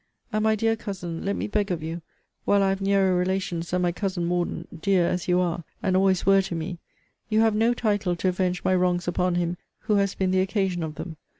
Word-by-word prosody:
And, 215 0 +1
my 220 0 +3
dear 225 +1 +1
Cousin, 180 -6 -6
let 200 +1 -1
me - - -2
beg 210 -1 0
of 170 -4 -2
you 165 +2 -4 0.4
while 200 -1 +3
I 195 - +3
have 195 0 -1
nearer 195 -1 +3
relations 180 -2 -1
than 180 0 0
my 175 - +2
Cousin 185 -1 -2
Morden, 175 -1 -2
dear 190 -2 +3
as 175 +1 -1
you 180 0 +3
are, 175 -1 -1 0.2
and 185 - +1
always 190 -1 +3
were 195 0 +6
to 190 -2 -4
me, 165 +2 -4 0.5
you 220 0 +3
have 225 -1 +4
no 225 +3 +2
title 205 -6 0
to 185 +2 0
avenge 180 -1 -1
my 185 - +2
wrongs 180 -1 +1
upon 180 0 +1
him 175 0 -1 0.2
who 215 -2 +1
has 200 -1 +1
been 190 -1 0
the 185 0 +3
occasion 190 -2 0
of 155 -1 -4
them. 165 -2 -7
185 Hz, 230 wpm, -25 LUFS, 175-200 Hz, 0.5 s, were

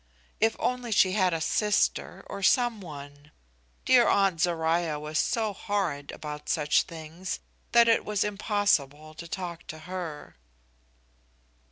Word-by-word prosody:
If 225 0 +3
only 250 -2 -2
she 190 -2 +4
had 185 -2 +2
a 165 - -1
sister, 210 +6 0
or 200 - -7
some 240 +1 +3
one! 145 -3 -10 0.6
Dear 245 -2 +6
Aunt 195 -5 +2
Zoruiah 165 -2 +1
was 150 +1 -2
so 220 -4 0
horrid 185 -9 -2
about 150 -1 -7
such 150 -2 +3
things 165 +3 -6 0.3
that 235 0 +6
it 230 - +4
was 210 -2 0
impossible 200 -8 0
to 170 +2 -9
talk 175 -1 -6
to 155 - -7
her! 175 - -6
180 Hz, 135 wpm, -28 LUFS, 155-210 Hz, 0.6 s, Dear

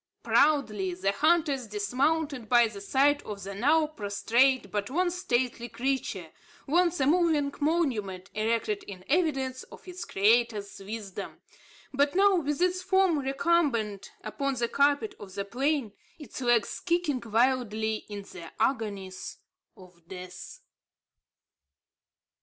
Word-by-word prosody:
Proudly 215 -12 +2
the 195 +2 0
hunters 290 -1 +2
dismounted 255 +5 -1
by 240 -1 +6
the 205 -3 -9
side 280 +7 +2
of 200 -2 -7
the 200 +1 -6
now 295 +10 +3
prostrate 235 -2 +1
but 205 +2 -2
once 350 +5 0
stately 240 -5 -1
creature, 235 -11 -3 0.3
once 345 +3 +2
a 265 - +2
moving 305 -3 +2
monument, 235 - -1
erected 230 - -1
in 185 -2 -10
evidence 270 -5 0
of - - -15
its 365 0 -6
Creator's 215 0 +1
wisdom, 200 -1 -7 0.5
but 285 +4 +2
now 400 +1 +5
with 295 +1 0
its 365 0 +1
form 380 -4 +2
recumbent 270 - 0
upon 270 +6 -2
the 235 -1 0
carpet 285 - +2
of 195 -2 -11
the 200 0 -3
plain, 265 0 -1 0.2
its 295 -3 -9
legs 240 -4 +1
kicking 340 -7 0
wildly 225 -2 +1
in 205 -1 -6
the 170 -4 -11
agonies 205 -6 -2 0.4
of 180 -2 -17
death. 185 -1 -9
250 Hz, 125 wpm, -28 LUFS, 205-295 Hz, 0.5 s, by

